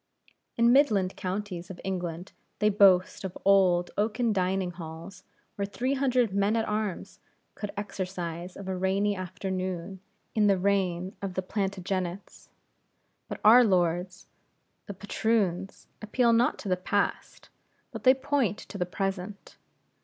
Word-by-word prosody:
In 235 +1 +5
midland 210 -10 +3
counties 185 -2 -4
of 185 - -9
England 180 -2 -4 0.3
they 210 - +3
boast 195 -3 +4
of 190 -1 -5
old 185 -3 +4
oaken 225 +2 +1
dining 185 -1 0
halls 170 +2 -9 0.3
where 200 - -2
three 255 +6 -1
hundred 255 -6 +1
men 200 +2 +2
at 225 -1 0
arms 210 -3 -3 0.3
could 210 - -6
exercise 180 -3 -5
of 200 - -8
a 190 - -2
rainy 195 +2 +1
afternoon, 185 0 -4 0.3
in 210 -2 +3
the 195 -1 +4
reign 185 -1 0
of 195 -2 -4
the 185 - -1
Plantagenets. 190 -1 -4 0.8
But - - -7
our 240 +4 +9
lords, 180 -3 0 0.6
the 200 - -6
Patroons, 195 -2 -1 0.2
appeal 235 +2 +2
not 235 +2 +3
to - - -8
the 185 -1 +1
past, 200 +3 -2 0.4
but - - -8
they 255 +1 +7
point 265 -6 0
to 200 - -9
the 180 - -1
present. 195 +1 -4
195 Hz, 140 wpm, -28 LUFS, 180-210 Hz, 0.8 s, our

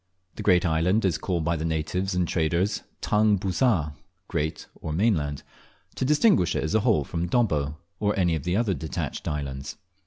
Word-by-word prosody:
The - - -7
great 90 -2 +4
island 90 +6 +2
is 90 -4 +1
called 85 -4 -1
by 85 0 +1
the 80 - -3
natives 85 +4 -1
and 90 -1 +1
traders 85 +5 0 0.2
"Tang 105 -1 +3
busar" 95 - +1 0.3
(great 80 +1 -2
or 80 - -7
mainland), 75 -6 0 0.5
to - - -3
distinguish 150 - +3
it - - 0
as 80 - -2
a 110 - +4
whole 105 - +2
from 85 +5 -3
Dobbo, 80 - +1 0.2
or 105 -1 0
any 90 -3 +2
of 80 - -1
the 90 - +1
detached 80 -4 -4
islands. 70 -2 -4
90 Hz, 175 wpm, -26 LUFS, 80-100 Hz, 0.5 s, great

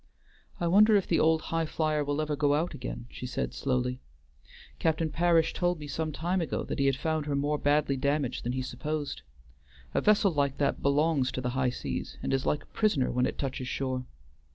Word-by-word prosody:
"I 175 - -1
wonder 210 +5 +6
if 200 - +3
the 165 - +2
old 160 0 +3
Highflyer 155 -2 0
will 145 +1 -1
ever 150 -1 -1
go 145 0 +2
out 165 +4 -1
again?" 125 -1 -6
she 125 - -6
said - - -3
slowly. 125 -1 -1 0.8
"Captain 160 0 +1
Parish 165 0 +3
told 175 -1 0
me 150 - -8
some 155 +2 -3
time 175 +5 -1
ago 165 - -2
that - - -4
he 140 - +3
had 135 - +3
found 155 +1 -2
her 145 - 0
more 145 +1 0
badly 145 -1 +2
damaged 140 -1 0
than 120 - -2
he 130 0 -2
supposed. 145 +3 -4 0.7
A - - +2
vessel 205 -2 +4
like 140 -3 0
that 145 - 0
belongs 140 -1 +2
to 130 - -3
the 125 0 -2
high 130 0 +1
seas, 125 - -5
and - - -1
is 135 -1 0
like 150 - 0
a - - -27
prisoner 205 - +2
when 125 0 +2
it - - -5
touches 130 -2 -3
shore. 130 -1 -2
145 Hz, 205 wpm, -29 LUFS, 135-160 Hz, 0.8 s, wonder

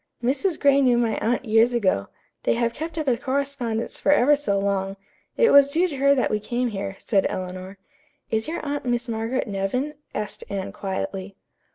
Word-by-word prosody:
"Mrs. 290 +8 0
Gray 280 -1 +4
knew 250 -3 +4
my 230 -3 +1
aunt 240 +3 0
years 225 +2 +4
ago. 185 - +1 0.3
They - - +1
have 235 0 0
kept 320 +2 -6
up 310 -2 -2
a 245 -3 +3
correspondence 260 -4 -2
for - - +2
ever 290 +1 +5
so 280 -9 -1
long. 195 0 -1 0.4
It 470 - +5
was 280 0 +7
due 340 +5 +2
to 295 -6 -6
her 280 +1 +4
that 255 - +1
we 215 - +1
came 240 +3 -1
here," 195 -2 -4
said 200 -4 +1
Eleanor. 185 +1 -6 0.5
"Is 220 +2 0
your 320 -1 -4
aunt 285 0 -2
Miss 240 0 -1
Margaret 230 +3 -2
Nevin?" 210 +9 -2 0.2
asked 210 - -4
Anne 195 -1 -3
quietly. 195 0 -4
240 Hz, 190 wpm, -24 LUFS, 200-280 Hz, 0.5 s, was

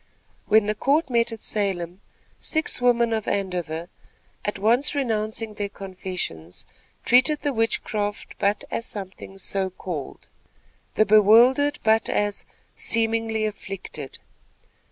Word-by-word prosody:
When 215 0 +5
the 210 - +1
court 280 +6 +1
met 235 -1 +2
at 225 - -7
Salem, 190 -3 -2 0.4
six 315 -5 0
women 235 -2 +3
of 220 -2 -2
Andover, 175 -4 -2 0.6
at 205 - -2
once 235 +9 +2
renouncing 220 -4 -1
their 205 -1 -3
confessions, 185 - -6 0.4
treated 260 +5 +4
the 285 - -1
witchcraft 215 -2 -2
but 205 0 +1
as 230 - -2
something 195 -1 -8
"so 195 0 -1
called," 175 -6 -7 0.7
the 215 - +4
bewildered 230 +8 +6
but 220 0 +3
as 205 -1 -1 0.3
"seemingly 225 -1 +1
afflicted." 195 -2 -6
215 Hz, 115 wpm, -24 LUFS, 195-230 Hz, 0.7 s, bewildered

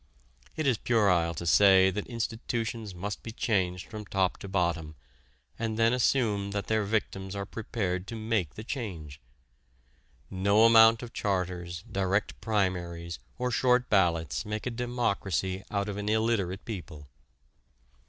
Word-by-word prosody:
It 155 - -2
is 125 -5 +2
puerile 90 -8 +2
to 85 - -5
say 95 +1 +6
that 105 +2 -4
institutions 115 -3 -3
must 100 +3 -5
be 115 - -7
changed 95 -6 -1
from 105 -1 -6
top 95 -1 0
to - - -8
bottom 85 -5 -1 0.6
and 110 -1 -2
then 115 +1 +4
assume 115 -5 +1
that 100 0 -3
their 110 -1 +1
victims 100 -2 -2
are 100 0 -3
prepared 95 -5 -3
to 115 - -6
make 110 -8 -1
the 105 - -7
change. 85 - -6 1.1
No 100 +4 +4
amount 115 0 +7
of 120 - -9
charters, 90 -3 -2
direct 100 -2 -1
primaries, 90 -5 -2 0.2
or 125 -1 -1
short 125 +1 +2
ballots 85 -6 +2
make 105 0 -4
a 125 - -1
democracy 100 -7 -1
out 100 0 -1
of 105 -1 -4
an 105 0 -3
illiterate 110 -4 0
people. 80 -9 -7
100 Hz, 145 wpm, -29 LUFS, 90-115 Hz, 1.1 s, amount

